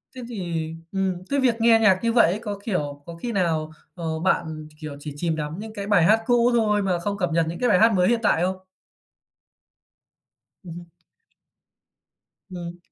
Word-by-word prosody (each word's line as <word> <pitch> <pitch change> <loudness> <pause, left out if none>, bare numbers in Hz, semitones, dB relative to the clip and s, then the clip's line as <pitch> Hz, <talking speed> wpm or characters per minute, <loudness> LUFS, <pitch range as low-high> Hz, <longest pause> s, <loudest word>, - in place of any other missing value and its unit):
Thế 255 - -7
thì 170 -8 -3 0.2
ừm, 190 -2 -2
cái 280 - +1
việc 255 -3 +3
nghe 225 0 +5
nhạc 200 -4 +4
như 230 0 +1
vậy 230 -8 +5
ấy, 200 - -3
có, 205 -3 -5
kiểu, 145 -9 -3
có 170 - -8
khi 235 +8 -5
nào, 165 -6 0 0.2
ờ, 160 -3 -3
bạn, 160 -3 -1
kiểu, 155 -2 -7
chỉ 145 0 -7
chìm 165 +2 -1
đắm 155 +3 -5
những 220 +1 -8
cái 200 -2 -6
bài 200 -5 +4
hát 215 +6 +4
cũ 240 -1 +3
thôi 210 -3 +2
mà 185 -3 0
không 200 +3 -3
cập 180 -3 0
nhật 165 0 +2
những 170 - -6
cái 250 - +2
bài 185 -4 +4
hát 225 +1 +5
mới 180 -1 +3
hiện 235 -1 +2
tại 185 -5 +3
không? 185 +1 -1 2.1
Ừm. 175 0 -9 1.7
Ừm. 175 -1 -7
185 Hz, 190 wpm, -24 LUFS, 165-220 Hz, 2.1 s, nghe